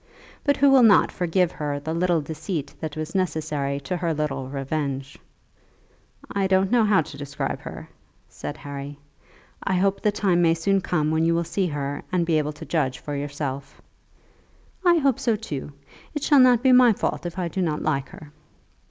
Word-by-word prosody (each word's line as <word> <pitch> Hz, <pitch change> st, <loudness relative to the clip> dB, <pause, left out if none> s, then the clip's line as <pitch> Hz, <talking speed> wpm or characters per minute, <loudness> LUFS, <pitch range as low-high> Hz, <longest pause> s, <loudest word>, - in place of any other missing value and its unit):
But 285 Hz, -1 st, +2 dB
who 280 Hz, 0 st, +5 dB
will 270 Hz, -1 st, +7 dB
not 220 Hz, -5 st, +6 dB
forgive 180 Hz, 0 st, +1 dB
her 145 Hz, -2 st, -3 dB
the 160 Hz, +3 st, -4 dB
little 170 Hz, -1 st, +1 dB
deceit 155 Hz, 0 st, -5 dB
that 155 Hz, -1 st, -5 dB
was 155 Hz, +1 st, -5 dB
necessary 155 Hz, -6 st, -1 dB
to 140 Hz, +7 st, -3 dB
her 170 Hz, -2 st, -1 dB
little 135 Hz, -3 st, -3 dB
revenge? 140 Hz, 0 st, -3 dB, 1.2 s
"I 195 Hz, -1 st, 0 dB
don't 190 Hz, +1 st, +2 dB
know 240 Hz, -2 st, +4 dB
how 205 Hz, -5 st, +4 dB
to 145 Hz, -, -11 dB
describe 140 Hz, -1 st, -4 dB
her," -, -, -9 dB, 0.4 s
said -, -, -7 dB
Harry. 140 Hz, 0 st, -7 dB, 0.7 s
"I 190 Hz, -, 0 dB
hope 195 Hz, +2 st, +1 dB
the 210 Hz, -, +2 dB
time 190 Hz, -4 st, +1 dB
may 165 Hz, -1 st, +4 dB
soon 195 Hz, +4 st, +1 dB
come 155 Hz, -4 st, 0 dB
when 160 Hz, 0 st, +1 dB
you 165 Hz, 0 st, +2 dB
will 170 Hz, -, +1 dB
see 175 Hz, +3 st, -1 dB
her, 145 Hz, -2 st, -3 dB
and 180 Hz, -2 st, +1 dB
be 165 Hz, -2 st, +2 dB
able 150 Hz, 0 st, -2 dB
to 150 Hz, -, -10 dB
judge 135 Hz, -6 st, 0 dB
for 145 Hz, -, -6 dB
yourself." 140 Hz, -1 st, -5 dB, 1.0 s
"I 350 Hz, -1 st, +5 dB
hope 275 Hz, -6 st, +2 dB
so 230 Hz, -3 st, +1 dB
too. 150 Hz, -10 st, -6 dB, 0.4 s
It 295 Hz, -, -3 dB
shall 290 Hz, -3 st, +5 dB
not 250 Hz, -2 st, +5 dB
be 260 Hz, -, +5 dB
my 250 Hz, -2 st, +7 dB
fault 180 Hz, -, -2 dB
if 175 Hz, -, -8 dB
I 180 Hz, -2 st, -1 dB
do 185 Hz, +3 st, -3 dB
not 155 Hz, -4 st, -1 dB
like 140 Hz, -3 st, -1 dB
her." 150 Hz, -1 st, -12 dB
165 Hz, 190 wpm, -24 LUFS, 145-195 Hz, 1.2 s, will